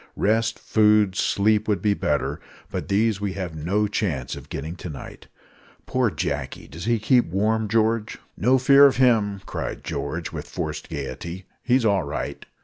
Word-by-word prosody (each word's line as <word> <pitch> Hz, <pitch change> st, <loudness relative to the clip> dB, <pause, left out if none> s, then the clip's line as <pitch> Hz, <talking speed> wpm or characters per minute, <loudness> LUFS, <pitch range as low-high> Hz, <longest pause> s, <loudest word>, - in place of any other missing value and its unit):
Rest, 110 Hz, +2 st, +1 dB
food, 105 Hz, -3 st, +3 dB
sleep, 105 Hz, +2 st, +2 dB
would 105 Hz, -2 st, +1 dB
be 105 Hz, -2 st, +2 dB
better; 75 Hz, -6 st, -1 dB, 0.3 s
but -, -, -4 dB
these 105 Hz, +1 st, +1 dB
we 100 Hz, -2 st, -2 dB
have 90 Hz, -4 st, -4 dB
no 95 Hz, +8 st, 0 dB
chance 85 Hz, -, -2 dB
of -, -, -11 dB
getting 80 Hz, +5 st, -5 dB
to 90 Hz, -, -7 dB
night. 75 Hz, -, -10 dB, 0.6 s
Poor -, -, +1 dB
Jacky! -, -, -4 dB
does 85 Hz, +4 st, -8 dB
he 120 Hz, 0 st, +2 dB
keep 120 Hz, +3 st, +3 dB
warm, 105 Hz, +5 st, 0 dB
George?" 110 Hz, 0 st, +1 dB, 0.2 s
"No 125 Hz, +4 st, +3 dB
fear 140 Hz, +2 st, +7 dB
of 135 Hz, -, 0 dB
him," 110 Hz, -6 st, +3 dB
cried -, -, -5 dB
George, -, -, -4 dB
with -, -, -7 dB
forced 80 Hz, -3 st, -5 dB
gaiety. 80 Hz, +5 st, -6 dB, 0.2 s
"He's 125 Hz, -1 st, +2 dB
all 100 Hz, -3 st, +3 dB
right." 75 Hz, -1 st, -5 dB
105 Hz, 165 wpm, -24 LUFS, 90-110 Hz, 0.6 s, fear